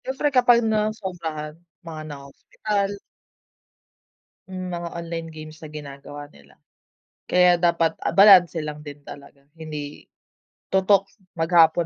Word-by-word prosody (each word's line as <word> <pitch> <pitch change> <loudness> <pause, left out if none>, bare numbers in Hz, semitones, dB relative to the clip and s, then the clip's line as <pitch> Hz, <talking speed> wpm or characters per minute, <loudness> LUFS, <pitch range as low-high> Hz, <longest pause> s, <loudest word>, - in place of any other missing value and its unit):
siyempre 270 +2 -2
kapag 245 -2 +4
nasobrahan 190 -8 -3 0.3
mga 160 -2 -7
naho-hospital. 195 +8 -4 1.5
Hmm, 185 -1 -5
mga 170 0 -4
online 165 -1 -5
games 155 0 -11
na 155 - -9
ginagawa 145 0 -9
nila, 70 0 -21 0.7
kaya 180 -1 +5
dapat, 170 -1 +2
ah, - - 0
balanse 185 -3 +7
lang 150 -1 -5
din 145 -1 -10
talaga, 140 0 -13
hindi 150 -2 -8 0.6
tutok 195 +1 +4 0.3
maghapon, 165 0 +4
165 Hz, 110 wpm, -23 LUFS, 150-190 Hz, 1.5 s, balanse